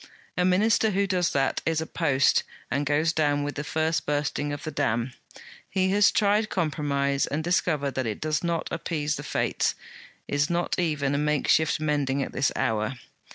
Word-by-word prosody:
A 180 - +1
Minister 205 +4 +3
who 200 0 +1
does 180 -3 +1
that, 135 -1 +1
is 160 -1 0
a 160 - -2
post, 145 -6 +2 0.3
and 140 0 0
goes 155 +3 +2
down 145 -2 +1
with 145 0 -3
the 145 - -4
first 160 0 -1
bursting 145 0 -1
of 145 0 -5
the 155 - -4
dam. 120 -1 -1 0.6
He 190 0 +1
has 205 +1 +5
tried 210 +1 +2
compromise 140 -5 0
and 155 +2 -2
discovered 155 -5 0
that 130 -3 -2
it 105 - -3
does 155 0 -1
not 170 -1 -1
appease 150 -3 -2
the - - -6
Fates; - - 0 0.5
is 145 +1 0
not 175 +1 -1
even 150 -5 0
a 140 - +1
makeshift 150 +1 +2
mending 145 -3 0
at - - -6
this 130 - +1
hour. 110 +3 0
150 Hz, 180 wpm, -26 LUFS, 140-170 Hz, 0.6 s, has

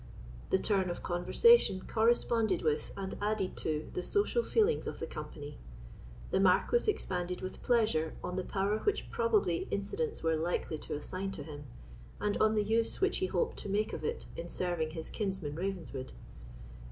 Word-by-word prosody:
The - - +4
turn 190 -2 +1
of 175 - -5
conversation 190 - +4
corresponded 225 -3 +2
with 155 -1 0
and 190 -1 -3
added 205 -2 0
to 155 -1 -2
the - - -2
social 410 - +2
feelings 450 0 +2
of - - -4
the - - -3
company. 145 -1 -8 0.7
The - - +3
Marquis 195 - +4
expanded 180 - -2
with 185 0 -6
pleasure 215 -10 +2
on 180 - -3
the 185 - -1
power 200 +3 0
which 415 - -1
probably 210 -7 +1
incidents 410 - -2
were 165 0 +3
likely 160 -1 -1
to - - -4
assign 185 +6 -4
to 145 - -5
him, 145 -1 -8 0.5
and 210 0 0
on 215 0 +3
the 210 - +3
use 225 +2 +1
which 390 +1 +2
he 375 - 0
hoped 475 - 0
to - - -5
make 210 +2 0
of - - -5
it 460 +1 -2
in 170 +1 -6
serving 175 -4 -1
his 160 0 -6
kinsman 190 -8 -2
Ravenswood. 165 -7 -4
195 Hz, 170 wpm, -32 LUFS, 170-225 Hz, 0.7 s, The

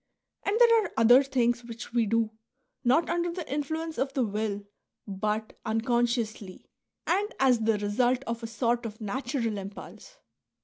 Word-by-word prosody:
And 410 +3 0
there 460 -2 +6
are - - -6
other 245 +4 +7
things 245 -3 0
which 235 0 -9
we 235 -2 +2
do, 225 0 +1 0.5
not 270 +7 +3
under 345 0 0
the 345 -1 -6
influence 315 +3 -3
of 270 0 -1
the 265 - +1
will, 205 -1 -2 0.4
but 210 +2 -2
uncon 235 +2 +1
sciously 220 -5 -4 0.4
and 405 +5 +1
as 255 -3 +4
the 220 -1 +2
result 240 +5 +1
of 230 -2 -4
a 230 - -4
sort 235 +1 0
of 215 0 -10
natural 230 0 -2
impulse." 200 - -10
240 Hz, 160 wpm, -28 LUFS, 220-275 Hz, 0.5 s, other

